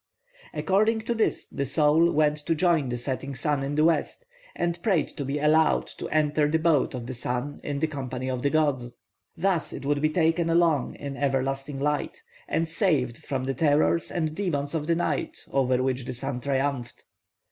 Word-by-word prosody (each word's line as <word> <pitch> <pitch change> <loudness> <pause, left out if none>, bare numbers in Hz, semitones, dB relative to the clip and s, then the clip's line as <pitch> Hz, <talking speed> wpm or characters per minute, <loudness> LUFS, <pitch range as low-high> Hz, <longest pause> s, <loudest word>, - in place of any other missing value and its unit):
According 215 +4 +2
to 230 +2 -1
this 225 -1 0
the 140 - -3
soul 150 +4 +3
went 150 0 +2
to 165 - +2
join 160 -5 +2
the 120 - -2
setting 135 +2 -4
sun 145 +2 0
in 140 +1 -2
the 155 +1 +4
west, 170 - 0 0.3
and 170 0 -1
prayed 175 -7 +1
to 140 - -5
be 140 +2 -2
allowed 155 +1 +3
to - - -4
enter 150 -1 +2
the 160 - +2
boat 160 -5 +2
of 120 -2 -5
the 130 - -5
sun 125 +3 -3
in 145 -1 -3
the 150 - +1
company 130 -4 -4
of 130 -1 -2
the 140 - +2
gods; 140 -6 0 0.4
thus 175 -2 0
it - - -7
would 145 0 +1
be 155 - +3
taken 165 +1 +1
along 165 -5 +2
in 140 -1 -6
everlasting 135 0 -1
light, 150 +1 -2 0.2
and 165 +1 0
saved 155 - 0
from 135 -3 -3
the 135 +1 -1
terrors 150 +3 +2
and 160 -3 -2
demons 150 -6 -2
of 155 -2 -2
the 170 - +3
night 165 -4 -1
over 130 -2 +2
which 130 -1 -1
the 125 - -4
sun 125 +1 -3
triumphed. 135 -2 -2
145 Hz, 190 wpm, -26 LUFS, 135-165 Hz, 0.4 s, the